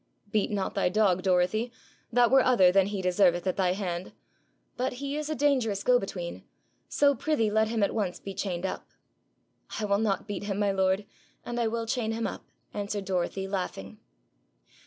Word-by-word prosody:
Beat 210 Hz, -2 st, +1 dB
not 200 Hz, -1 st, -2 dB
thy 195 Hz, -4 st, +1 dB
dog, 185 Hz, -2 st, +2 dB
Dorothy: 185 Hz, +5 st, +1 dB, 0.4 s
that 245 Hz, 0 st, +4 dB
were 265 Hz, 0 st, +7 dB
other 230 Hz, -9 st, +5 dB
than 195 Hz, 0 st, +4 dB
he 200 Hz, -2 st, -3 dB
deserveth 180 Hz, -1 st, +3 dB
at 185 Hz, -, 0 dB
thy 180 Hz, -2 st, +2 dB
hand. 185 Hz, -2 st, -4 dB, 0.6 s
But 255 Hz, +1 st, -1 dB
he 280 Hz, +3 st, -4 dB
is 305 Hz, 0 st, -3 dB
a 310 Hz, -, -1 dB
dangerous 255 Hz, -9 st, +1 dB
go 250 Hz, -1 st, +4 dB
between, 180 Hz, -4 st, -6 dB, 0.5 s
so 285 Hz, -1 st, +4 dB
prithee 270 Hz, -7 st, 0 dB
let 220 Hz, +1 st, +3 dB
him 225 Hz, 0 st, -1 dB
be -, -, +5 dB
at -, -, -4 dB
once 195 Hz, -5 st, -2 dB, 0.2 s
chained 180 Hz, -2 st, -3 dB
up.' -, -, -5 dB, 0.9 s
'I 215 Hz, -, -1 dB
will 200 Hz, 0 st, +2 dB
not 215 Hz, -2 st, 0 dB
beat 205 Hz, -1 st, -4 dB
him, 200 Hz, -1 st, -2 dB
my 205 Hz, -1 st, +2 dB
lord, 190 Hz, +1 st, +1 dB, 0.4 s
and 240 Hz, 0 st, -3 dB
I 235 Hz, -, +2 dB
will 230 Hz, +1 st, -2 dB
chain 225 Hz, -1 st, -1 dB
him 225 Hz, 0 st, -2 dB
up,' -, -, -6 dB, 0.3 s
answered 205 Hz, -1 st, -3 dB
Dorothy, 190 Hz, 0 st, -2 dB
laughing. 110 Hz, -, -4 dB
205 Hz, 185 wpm, -28 LUFS, 185-230 Hz, 0.9 s, were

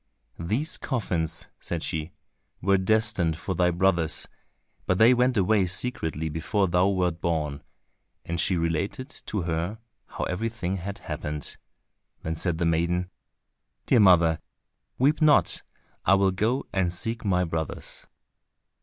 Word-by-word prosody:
"These 110 Hz, -, -1 dB
coffins," 85 Hz, -, -1 dB
said 85 Hz, -2 st, -3 dB
she, 80 Hz, +1 st, -3 dB, 0.5 s
"were 95 Hz, +1 st, +3 dB
destined 95 Hz, -5 st, +1 dB
for 90 Hz, +2 st, -3 dB
thy 90 Hz, 0 st, +2 dB
brothers, 85 Hz, -2 st, +2 dB, 0.6 s
but 95 Hz, -, +2 dB
they 115 Hz, +4 st, +7 dB
went 125 Hz, 0 st, +2 dB
away 100 Hz, 0 st, +3 dB
secretly 85 Hz, -, -1 dB
before 80 Hz, +6 st, 0 dB
thou 90 Hz, +2 st, +3 dB
wert 90 Hz, -4 st, 0 dB
born," 75 Hz, -4 st, -1 dB, 0.6 s
and 85 Hz, 0 st, -3 dB
she 90 Hz, +1 st, +2 dB
related 85 Hz, -, -2 dB, 0.2 s
to 105 Hz, -4 st, -2 dB
her 85 Hz, +5 st, -2 dB, 0.3 s
how -, -, -5 dB
everything 95 Hz, -1 st, -2 dB
had 100 Hz, +2 st, -5 dB
happened; 75 Hz, -1 st, -4 dB, 0.7 s
then 80 Hz, 0 st, -2 dB
said 85 Hz, 0 st, -1 dB
the 85 Hz, -, 0 dB
maiden, 85 Hz, +2 st, 0 dB, 0.7 s
"Dear -, -, +4 dB
mother, 85 Hz, -5 st, +5 dB, 0.6 s
weep 145 Hz, +5 st, +2 dB
not, 155 Hz, -1 st, +4 dB, 0.4 s
I -, -, +5 dB
will 95 Hz, -1 st, +3 dB
go 110 Hz, +8 st, 0 dB
and 95 Hz, -3 st, +1 dB
seek 115 Hz, +6 st, -3 dB
my 90 Hz, -3 st, +2 dB
brothers." 80 Hz, -2 st, -4 dB
90 Hz, 135 wpm, -26 LUFS, 85-105 Hz, 0.7 s, they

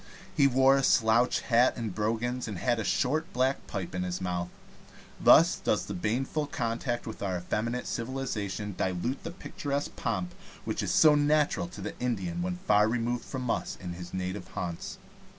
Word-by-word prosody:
He 140 Hz, -, +5 dB
wore 135 Hz, +1 st, +5 dB
a 135 Hz, -, +1 dB
slouch 115 Hz, 0 st, +3 dB
hat 120 Hz, +1 st, +3 dB
and 115 Hz, -5 st, -3 dB
brogans, 115 Hz, +4 st, -1 dB
and 105 Hz, -4 st, -4 dB
had 120 Hz, +5 st, +1 dB
a -, -, -1 dB
short 155 Hz, +9 st, 0 dB
black 130 Hz, +2 st, 0 dB
pipe 95 Hz, -6 st, -5 dB
in 90 Hz, -, -2 dB
his 90 Hz, 0 st, -2 dB
mouth. 90 Hz, -1 st, -2 dB, 0.7 s
Thus -, -, +6 dB
does -, -, 0 dB
the -, -, -5 dB
baneful 130 Hz, -, -1 dB
contact 120 Hz, -1 st, -2 dB
with 110 Hz, -, -7 dB
our 95 Hz, -3 st, -1 dB
effeminate 115 Hz, +7 st, -2 dB
civilization 110 Hz, -5 st, -3 dB
dilute 95 Hz, +9 st, -2 dB
the -, -, -4 dB
picturesque 145 Hz, -5 st, -4 dB
pomp 90 Hz, -1 st, -2 dB, 0.3 s
which -, -, -2 dB
is -, -, -2 dB
so 155 Hz, -1 st, +6 dB
natural 150 Hz, -, +2 dB
to 95 Hz, +3 st, -10 dB
the 105 Hz, -, -4 dB
Indian 170 Hz, +8 st, -2 dB
when 180 Hz, 0 st, -2 dB
far 105 Hz, -6 st, +5 dB
removed 120 Hz, +1 st, -1 dB
from 125 Hz, -3 st, -3 dB
us -, -, -2 dB
in 90 Hz, -2 st, -6 dB
his 90 Hz, 0 st, -8 dB
native 95 Hz, +2 st, -4 dB
haunts. 85 Hz, -3 st, -4 dB
115 Hz, 175 wpm, -29 LUFS, 95-130 Hz, 0.7 s, Thus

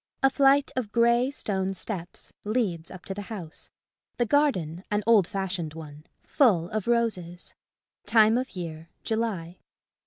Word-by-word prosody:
A 270 Hz, -, +5 dB
flight 275 Hz, +1 st, +4 dB
of 240 Hz, -5 st, -3 dB
grey 235 Hz, +2 st, +3 dB
stone 195 Hz, -8 st, -1 dB
steps 180 Hz, -3 st, -4 dB
leads 205 Hz, -7 st, -1 dB
up 185 Hz, -1 st, -11 dB
to 195 Hz, -, -3 dB
the 205 Hz, -, -6 dB
house. 180 Hz, -8 st, -7 dB, 0.5 s
The 240 Hz, -, +2 dB
garden, 195 Hz, -, +1 dB
an 210 Hz, 0 st, 0 dB
old 215 Hz, -6 st, +5 dB
fashioned 185 Hz, -5 st, -3 dB
one, 155 Hz, -1 st, -10 dB, 0.2 s
full 190 Hz, -, +3 dB
of 215 Hz, -1 st, -3 dB
roses. 200 Hz, -8 st, -1 dB, 0.5 s
Time 220 Hz, -1 st, +5 dB
of 255 Hz, -2 st, -2 dB
year, 165 Hz, -2 st, -6 dB
July. 205 Hz, -7 st, -2 dB
205 Hz, 145 wpm, -27 LUFS, 175-235 Hz, 0.5 s, A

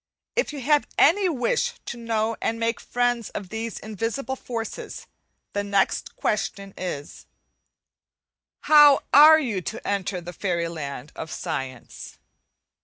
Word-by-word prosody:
If -, -, 0 dB
you 290 Hz, -2 st, -6 dB
have 295 Hz, +3 st, +2 dB
any 380 Hz, +2 st, +5 dB
wish 480 Hz, -, 0 dB
to -, -, -5 dB
know 230 Hz, -1 st, -1 dB
and 230 Hz, -, -1 dB
make 230 Hz, 0 st, 0 dB
friends 245 Hz, -2 st, -1 dB
of 190 Hz, -, -7 dB
these 225 Hz, +1 st, -4 dB
invisible 225 Hz, +6 st, -3 dB
forces, 230 Hz, -3 st, -6 dB, 0.5 s
the 205 Hz, -, -1 dB
next 200 Hz, -1 st, 0 dB
question 200 Hz, -2 st, -2 dB
is 150 Hz, -6 st, -6 dB, 1.3 s
How 295 Hz, -2 st, +7 dB
are 310 Hz, +2 st, +9 dB
you 230 Hz, -10 st, -2 dB
to 220 Hz, +6 st, -6 dB
enter 195 Hz, -2 st, -1 dB
the 175 Hz, +1 st, -9 dB
fairy 170 Hz, -3 st, -1 dB
land 145 Hz, -3 st, -6 dB
of 160 Hz, -, -6 dB
science? 135 Hz, -8 st, -6 dB
225 Hz, 130 wpm, -24 LUFS, 185-265 Hz, 1.3 s, are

